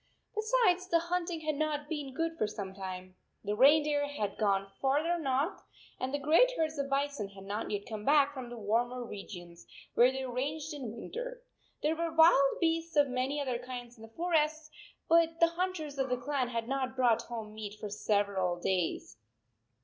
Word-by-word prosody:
Besides, 430 Hz, -5 st, +2 dB
the 340 Hz, -, +4 dB
hunting 345 Hz, 0 st, -2 dB
had 310 Hz, -1 st, -1 dB
not 295 Hz, -1 st, -1 dB
been 290 Hz, -4 st, -4 dB
good 330 Hz, 0 st, -1 dB
for 215 Hz, -, 0 dB
some 200 Hz, -2 st, -6 dB
time. 185 Hz, -1 st, -7 dB, 0.3 s
The 205 Hz, 0 st, -1 dB
reindeer 290 Hz, +3 st, +5 dB
had 215 Hz, -8 st, -3 dB
gone 195 Hz, -2 st, +1 dB
far 275 Hz, +3 st, +2 dB
ther 345 Hz, +1 st, 0 dB
north, 280 Hz, +3 st, 0 dB, 0.4 s
and 255 Hz, -, -2 dB
the 285 Hz, -, 0 dB
great 315 Hz, -, +5 dB
herds 315 Hz, -2 st, -1 dB
of 280 Hz, 0 st, -1 dB
bison 275 Hz, -6 st, -1 dB
had 195 Hz, -1 st, -12 dB
not 205 Hz, +3 st, -4 dB
yet 205 Hz, -1 st, -3 dB
come 215 Hz, -2 st, -6 dB
back 285 Hz, +2 st, +4 dB
from 255 Hz, -3 st, -7 dB
the 240 Hz, -, -8 dB
warmer 240 Hz, +4 st, 0 dB
re 205 Hz, -3 st, -7 dB
gions, 175 Hz, -3 st, -10 dB, 0.3 s
where 245 Hz, +2 st, +6 dB
they 265 Hz, 0 st, -4 dB
ranged 290 Hz, +5 st, -3 dB
in 250 Hz, -6 st, -6 dB
winter. -, -, -6 dB, 0.4 s
There 310 Hz, +2 st, +2 dB
were 335 Hz, 0 st, -2 dB
wild 320 Hz, -4 st, +5 dB
beasts 330 Hz, -1 st, 0 dB
of 290 Hz, -2 st, +4 dB
many 255 Hz, +3 st, -1 dB
other 255 Hz, -4 st, -1 dB
kinds 245 Hz, -1 st, -7 dB
in 225 Hz, -, -17 dB
the 225 Hz, -, -11 dB
forest, 310 Hz, -3 st, 0 dB, 0.4 s
but 330 Hz, 0 st, +4 dB
the 335 Hz, -, +6 dB
hunters 335 Hz, -5 st, -3 dB
of 265 Hz, -1 st, 0 dB
the 250 Hz, -, +1 dB
clan 265 Hz, 0 st, -1 dB
had 230 Hz, -1 st, -3 dB
not 265 Hz, -1 st, -2 dB
brought 240 Hz, -3 st, +3 dB
home 225 Hz, -3 st, -7 dB
meat 215 Hz, -1 st, -6 dB
for 210 Hz, -, -5 dB
several 200 Hz, -4 st, 0 dB
days. 180 Hz, -1 st, -1 dB
275 Hz, 190 wpm, -31 LUFS, 225-315 Hz, 0.4 s, where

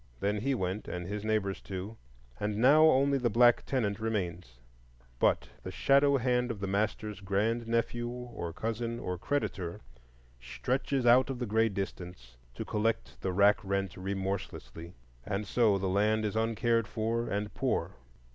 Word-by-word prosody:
Then 105 Hz, +7 st, 0 dB
he 135 Hz, +5 st, 0 dB
went, 95 Hz, -1 st, -3 dB
and 90 Hz, -1 st, -4 dB
his 100 Hz, +2 st, -4 dB
neighbors 105 Hz, -3 st, -1 dB
too, 95 Hz, +3 st, -6 dB, 0.4 s
and 105 Hz, 0 st, -2 dB
now 145 Hz, +7 st, +6 dB
only 140 Hz, -2 st, +4 dB
the 120 Hz, -2 st, +1 dB
black 120 Hz, +2 st, +5 dB
tenant 110 Hz, -6 st, 0 dB
remains; 90 Hz, -, -3 dB, 0.6 s
but -, -, +2 dB
the -, -, -6 dB
shadow 140 Hz, +7 st, +4 dB
hand 125 Hz, 0 st, +1 dB
of 115 Hz, -4 st, -4 dB
the 100 Hz, -, -2 dB
master's 105 Hz, +1 st, -2 dB
grand 105 Hz, +4 st, 0 dB
nephew 120 Hz, +1 st, -1 dB
or 120 Hz, -8 st, -6 dB
cousin 115 Hz, +5 st, -3 dB
or 90 Hz, -6 st, -4 dB
creditor 95 Hz, -10 st, -2 dB, 0.6 s
stretches 130 Hz, -, -2 dB
out 125 Hz, +3 st, +6 dB
of 135 Hz, -, -3 dB
the 125 Hz, -, -3 dB
gray 110 Hz, +1 st, +2 dB
distance 90 Hz, -, -6 dB, 0.2 s
to -, -, -5 dB
collect 110 Hz, +2 st, -2 dB
the 95 Hz, -, -1 dB
rack 100 Hz, +3 st, +4 dB
rent 100 Hz, -2 st, -2 dB
remorselessly, 95 Hz, -3 st, -5 dB, 0.3 s
and 100 Hz, +4 st, -3 dB
so 105 Hz, -1 st, +3 dB
the 95 Hz, -, -3 dB
land 105 Hz, +3 st, +2 dB
is 105 Hz, -, -2 dB
uncared 115 Hz, 0 st, +1 dB
for 115 Hz, +2 st, -1 dB
and 105 Hz, 0 st, -2 dB
poor. -, -, -1 dB
105 Hz, 155 wpm, -30 LUFS, 95-120 Hz, 0.6 s, now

